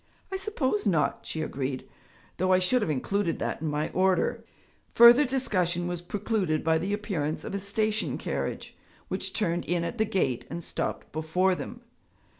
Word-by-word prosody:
'I 385 - -1
suppose 280 - -1
not,' 165 -6 +1
she 160 - -2
agreed, 130 -3 -3 0.5
'though 185 +1 +1
I 185 - +6
should 185 +7 +2
have 210 - -1
included 165 +5 0
that - - -3
in 160 - -2
my 150 +1 -1
order.' 185 -1 +1 0.5
Further 240 +5 +9
discussion 185 -10 0
was 175 -1 -3
precluded 190 -4 -1
by 160 0 +3
the 190 +5 -2
appearance 190 -8 -2
of - - -6
a 200 - -1
station 215 +2 -1
carriage - - -4 0.3
which - - -2
turned 175 -5 0
in 175 -1 0
at 225 +7 -4
the 220 - +4
gate 185 - 0
and 170 +1 -5
stopped - - -4
before 165 +5 +1
them. 235 +6 -6
185 Hz, 170 wpm, -28 LUFS, 160-215 Hz, 0.5 s, Further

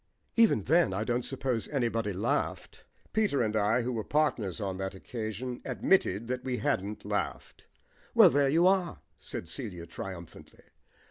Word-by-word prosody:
"Even 225 - +4
then 155 - +3
I 105 - -1
don't 120 +2 0
suppose 125 -2 -2
anybody 115 -6 -1
laughed." 115 +10 -2 0.3
Peter 200 - +2
and 110 -1 -1
I, 110 +3 +2
who 125 +1 -2
were 110 -2 -2
partners 125 - 0
on 95 -3 -3
that 95 0 -3
occasion, 115 +4 -5
admitted 115 - +1
that 125 +1 -3
we 130 -2 -2
hadn't 105 -8 -2
laughed. - - -4 0.5
"Well, - - +8
there 140 0 +3
you 165 +5 +4
are," 185 -2 +2 0.2
said - - -7
Celia 90 - -6
triumphantly. 85 0 -9
120 Hz, 150 wpm, -30 LUFS, 100-140 Hz, 0.5 s, Well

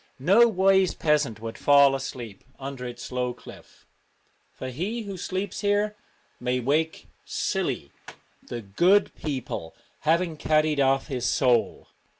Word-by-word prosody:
No 195 - +5
wise 190 -2 +3
peasant 150 -8 +1
would 115 0 -6
fall 140 -1 +6
asleep 125 -6 -6
under 135 -2 -6
its 120 +1 -8
low 125 -1 -2
cliff, - - -15 0.7
for 130 - -7
he 195 - -3
who 200 -2 -6
sleeps 190 +2 -4
here 205 +1 +1 0.4
may 125 0 0
wake 155 +6 -1 0.2
'silly,' - - -2 0.5
the 120 -2 -7
'good 175 - +3
people' 130 - -5 0.2
having 165 +1 +1
carried 155 -1 +2
off 135 0 +3
his 130 -5 -2
soul. 125 -3 +1
145 Hz, 130 wpm, -26 LUFS, 125-185 Hz, 0.7 s, fall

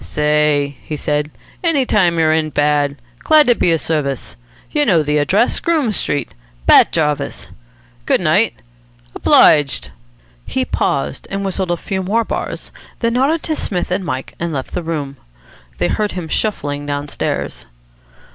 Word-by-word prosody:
"Say!" 150 -1 +1
he 155 - -5
said. 150 0 -1 0.3
"Any 310 -6 +2
time 180 -7 +2
you're 160 -1 +3
in 160 -1 +1
bad. 145 -1 +1 0.2
Glad 310 -1 +5
to 245 - +5
be 180 - +1
of 165 - +1
service. 140 -5 -2 0.4
You 295 - +2
know 180 - +3
the 150 0 +1
address. 190 +11 +2
Groome 310 -9 +1
Street. 145 -8 -2 0.3
Bat - - +6
Jarvis. 150 -3 -1 0.6
Good - - +3
night. - - +2 0.6
Obliged." 145 -3 +4 0.6
He - - -1
paused 70 +1 -2
and 195 0 -3
whistled 190 -1 -2
a 175 - 0
few 190 +2 -3
more 215 +5 +1
bars, - - -5 0.3
then 230 -1 +1
nodded 280 +6 +1
to 315 - -1
Psmith 180 -9 -3
and 185 +2 0
Mike, 130 -6 -4
and 170 0 -2
left 135 -4 -4
the - - -2
room. 150 -5 -4 0.6
They 85 - +1
heard 210 -1 -1
him 180 -3 -5
shuffling 145 -10 -2
downstairs. 145 0 -3
160 Hz, 155 wpm, -17 LUFS, 145-205 Hz, 0.6 s, Bat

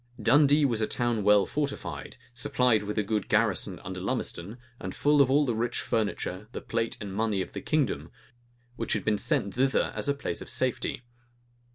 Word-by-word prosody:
Dundee 145 +6 +5
was 115 -5 +1
a 110 - +1
town 120 -3 0
well 105 -1 +5
fortified, 145 -1 -4 0.2
supplied 125 -3 +2
with 105 +1 -5
a 105 - +2
good 105 -1 -2
garrison - - +1
under - - -6
Lumisden, 100 +8 -3 0.2
and 95 - -6
full 145 0 +4
of 135 - +4
all 145 +2 +4
the 120 - 0
rich 120 +2 -1
furniture, 105 -2 -2
the - - -4
plate 115 0 -2
and 100 -3 -6
money 110 -1 0
of - - -13
the - - -5
kingdom, 150 -8 0 0.7
which 115 - -2
had - - -2
been 105 -1 +1
sent 100 -1 +2
thither 130 +3 +1
as - - -2
to 140 - +2
a - - -11
place 140 - -4
of - - -8
safety. 130 -1 0
115 Hz, 195 wpm, -28 LUFS, 105-135 Hz, 0.7 s, Dundee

